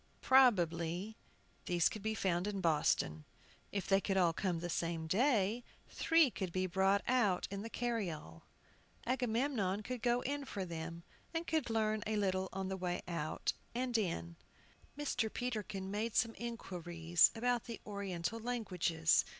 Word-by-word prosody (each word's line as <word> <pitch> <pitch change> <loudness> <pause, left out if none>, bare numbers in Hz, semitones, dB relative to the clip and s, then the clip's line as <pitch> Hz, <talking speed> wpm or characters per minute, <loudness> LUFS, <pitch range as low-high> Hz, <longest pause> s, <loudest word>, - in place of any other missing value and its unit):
Probably 185 -6 +3 0.5
these 175 -2 +3
could 215 - -4
be 220 +1 -1
found 185 -2 0
in 205 -1 -2
Boston. 150 - +1 0.5
If 200 -2 -2
they 195 0 +3
could 195 -1 0
all 175 -3 +4
come 180 0 -1
the 170 +1 -3
same 165 -1 -2
day, 220 - +2 0.3
three 325 -5 +4
could 190 -5 -4
be 185 +1 0
brought 190 +2 +2
out 225 -8 +2
in 200 0 -3
the 225 - -6
carryall. 185 - -3 0.6
Agamemnon 235 -5 0
could 250 +1 -4
go 245 +1 +2
in 285 +1 -2
for 195 -7 -4
them, 165 0 -6 0.3
and 330 +1 -1
could 315 -7 0
learn 215 -1 +1
a 215 - 0
little 190 -2 0
on 190 0 -3
the 190 0 -3
way 180 -1 -2
out 165 -3 -2 0.2
and 250 0 -1
in. 85 - -1 0.6
Mr. 250 -6 -1
Peterkin 210 -6 -3
made 215 +2 -2
some 225 0 +3
inquiries 175 -7 +1
about 245 0 0
the 230 -3 -6
Oriental 200 0 -3
languages. 180 -9 +2
200 Hz, 150 wpm, -35 LUFS, 175-235 Hz, 0.6 s, all